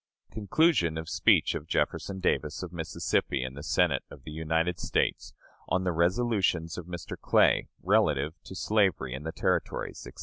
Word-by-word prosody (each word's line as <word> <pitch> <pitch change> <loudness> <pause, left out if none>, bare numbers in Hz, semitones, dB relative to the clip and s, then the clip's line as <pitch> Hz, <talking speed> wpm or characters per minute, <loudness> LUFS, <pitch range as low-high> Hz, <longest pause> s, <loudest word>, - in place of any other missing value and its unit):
Conclusion 110 - +2
of 80 0 -5
speech - - +3
of 75 - -5
Jefferson 95 +3 -1
Davis, 75 -2 -1
of 90 -1 -7
Mississippi, 80 -5 -1
in 65 0 -5
the 70 - -8
Senate 80 -3 +2
of - - -13
the - - -8
United 80 +3 -1
States, - - -1 0.4
on 95 - +1
the 90 - +1
resolutions 90 -1 +1
of 90 -2 -7
Mr. 85 -2 -6
Clay, - - +3 0.2
relative 75 +2 +2
to 95 - -9
slavery 95 - +1
in 65 - -5
the 80 - -2
Territories, - - -2
etc. - - -13
85 Hz, 165 wpm, -28 LUFS, 80-95 Hz, 0.4 s, speech